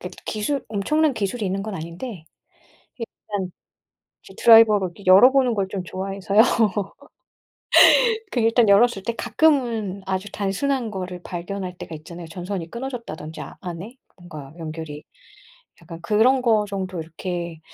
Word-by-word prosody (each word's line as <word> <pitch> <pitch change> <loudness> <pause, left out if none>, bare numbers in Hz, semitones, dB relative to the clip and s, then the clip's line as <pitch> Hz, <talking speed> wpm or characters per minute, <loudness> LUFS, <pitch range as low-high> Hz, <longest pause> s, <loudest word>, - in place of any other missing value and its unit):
이렇게 - - -8
기술 240 +6 -2
엄청난 285 +8 +1
기술이 210 +2 -3
있는 195 +1 -2
건 215 -2 -5
아닌데 170 +3 -7 0.7
이게 230 - -5 0.2
그냥 195 -3 -3 0.7
이제 - - -14
드라이버로 220 -4 +7
이렇게 195 +3 -14
열어보는 250 +6 +6
걸 195 -2 -1
좀 190 -2 -5
좋아해서요. 195 +3 0 1.9
그 - - -1
일단 225 0 +3
열었을 200 0 +4
때 235 - -2
가끔은 235 -7 +1
아주 190 +1 -3
단순한 220 +4 -2
거를 180 -2 -6
발견할 180 +1 -6
때가 160 - -8
있잖아요. 170 +2 -10
전선이 175 0 -6
끊어졌다든지, 230 - -7
아 - - -9
안에 185 +8 -8 0.2
뭔가 155 -6 -11
연결이. 155 -2 -7 0.8
약간 165 0 -10
그런 235 +8 +3
거 220 -3 +3
정도 190 -3 -4
이렇게 170 0 -6
195 Hz, 320 characters per minute, -22 LUFS, 175-230 Hz, 1.9 s, 드라이버로